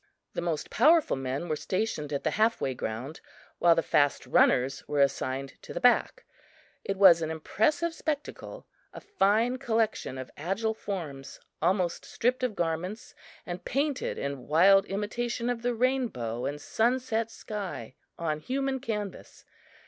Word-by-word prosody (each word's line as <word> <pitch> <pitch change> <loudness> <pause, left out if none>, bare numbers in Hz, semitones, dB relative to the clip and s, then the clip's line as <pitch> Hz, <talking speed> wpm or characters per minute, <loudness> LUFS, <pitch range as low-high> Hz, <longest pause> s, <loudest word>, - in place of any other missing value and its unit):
The - - -2
most 165 -3 -3
powerful 310 +6 +4
men 135 +5 -3
were 155 - 0
stationed 170 -4 -2
at 140 - -2
the - - +1
half 220 +2 +2
way 130 - -1
ground, 125 +6 -5 0.4
while 170 -1 +6
the 165 - +1
fast 145 -2 +2
runners 130 +2 +3
were 145 -1 -1
assigned 135 0 0
to - - -10
the - - -1
back. 250 - +3 0.6
It 195 - -3
was 185 -4 +7
an 160 - -2
impressive 295 - 0
spectacle 310 - -5 0.3
a - - -6
fine 235 - +2
collection 225 - -1
of 130 -1 -7
agile 195 +8 -1
forms, 160 -11 -6 0.2
almost 180 -2 +1
stripped 250 +2 0
of 250 -5 -1
garments 175 +6 -3 0.3
and 175 0 -6
painted 280 +1 -1
in 140 -2 -4
wild 195 +6 +6
imitation 235 +4 -2
of 235 -1 -4
the 245 0 0
rainbow 225 - -1
and 145 +1 -4
sunset 230 - 0
sky 195 - -6 0.2
on 155 -2 -2
human 270 - -2
canvas. 210 -6 -6
195 Hz, 150 wpm, -28 LUFS, 150-240 Hz, 0.6 s, was